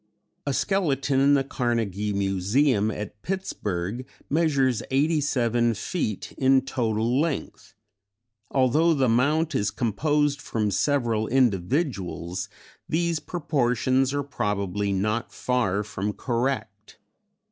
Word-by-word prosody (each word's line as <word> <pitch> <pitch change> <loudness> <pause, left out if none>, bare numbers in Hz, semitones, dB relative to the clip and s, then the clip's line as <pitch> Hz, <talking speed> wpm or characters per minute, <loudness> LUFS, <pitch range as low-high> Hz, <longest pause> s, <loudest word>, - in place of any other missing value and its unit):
A 140 - +1
skeleton 145 -8 +1
in 140 +1 +5
the 135 - +2
Carnegie 115 -6 -1
Museum 100 +4 +1
at 105 -1 -6
Pittsburgh 110 - -3 0.3
measures 140 -7 +2
87 130 -5 +1
feet 110 - -3
in 135 0 +5
total 115 -1 0
length; 160 -4 -4 0.7
although 150 +6 +3
the 135 -2 +2
mount 150 +8 +2
is 100 - +1
composed 145 +5 0
from 105 -2 -1
several 115 -1 +1
individuals 100 - 0 0.4
these 170 0 +1
proportions 135 -5 0
are 145 0 -1
probably 105 -6 -2
not 105 +4 -1
far 105 -6 0
from 105 0 -3
correct. 115 -4 -3
125 Hz, 105 wpm, -25 LUFS, 105-145 Hz, 0.7 s, in